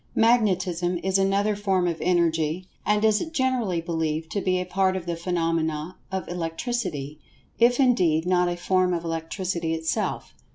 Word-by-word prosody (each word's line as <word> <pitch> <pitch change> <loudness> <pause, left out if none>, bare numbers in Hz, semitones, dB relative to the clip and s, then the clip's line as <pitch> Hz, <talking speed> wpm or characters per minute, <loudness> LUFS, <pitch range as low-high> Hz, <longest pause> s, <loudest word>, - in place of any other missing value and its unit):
Magnetism 185 -6 +2
is 190 +1 +2
another 200 +2 +2
form 190 -3 +1
of 170 -2 -2
Energy, 170 0 +1 0.2
and 210 +1 +3
is 215 -1 +4
generally 255 - 0
believed 160 -1 -2
to 200 - -1
be 185 -1 +1
a 180 - -2
part 190 +1 +1
of 185 -2 -4
the 170 -1 -2
phenomena 165 -1 -1 0.2
of 190 -1 -3
Electricity, 165 - -3 0.4
if 240 +2 +4
indeed, 180 - +3
not 180 -1 +2
a 175 - -3
form 180 0 +1
of 170 - -4
Electricity 165 0 -2
itself. 160 0 -2
180 Hz, 155 wpm, -25 LUFS, 165-195 Hz, 0.4 s, is